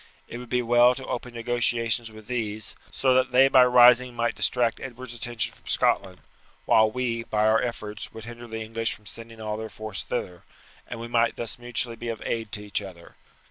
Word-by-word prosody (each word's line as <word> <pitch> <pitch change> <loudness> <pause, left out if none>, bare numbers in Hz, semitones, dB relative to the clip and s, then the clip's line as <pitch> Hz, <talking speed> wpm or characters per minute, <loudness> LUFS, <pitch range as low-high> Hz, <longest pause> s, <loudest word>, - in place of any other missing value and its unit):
It 120 - -7
would 125 -1 -10
be 125 0 +1
well 120 +1 +5
to 130 - -7
open 120 0 -5
negotiations 115 -1 +1
with 110 -1 -13
these, 110 -4 -3 0.2
so 130 -1 +2
that 130 0 +3
they 130 +2 +6
by 130 -1 +7
rising 125 0 +6
might 120 0 0
distract 120 -3 +1
Edward's 125 -1 -7
attention 120 0 -3
from - - -22
Scotland, 95 -2 +1 0.4
while 110 -1 +5
we, 115 0 -2
by 105 0 +1
our 110 +1 +4
efforts, 110 -3 -5
would 110 - -10
hinder 120 +1 -9
the 110 0 -5
English 115 +1 -2
from 105 - -21
sending 115 +2 -9
all 105 -1 -3
their 110 0 -6
force 110 -1 -6
thither, 90 -1 -4 0.5
and 120 - -6
we 115 - -6
might 115 -1 +2
thus 120 +1 -4
mutually 120 -1 -2
be 120 +1 -6
of 115 - -5
aid 115 -2 -3
to 105 0 -5
each 105 - -2
other. 90 -4 -12
115 Hz, 205 wpm, -26 LUFS, 110-120 Hz, 0.5 s, by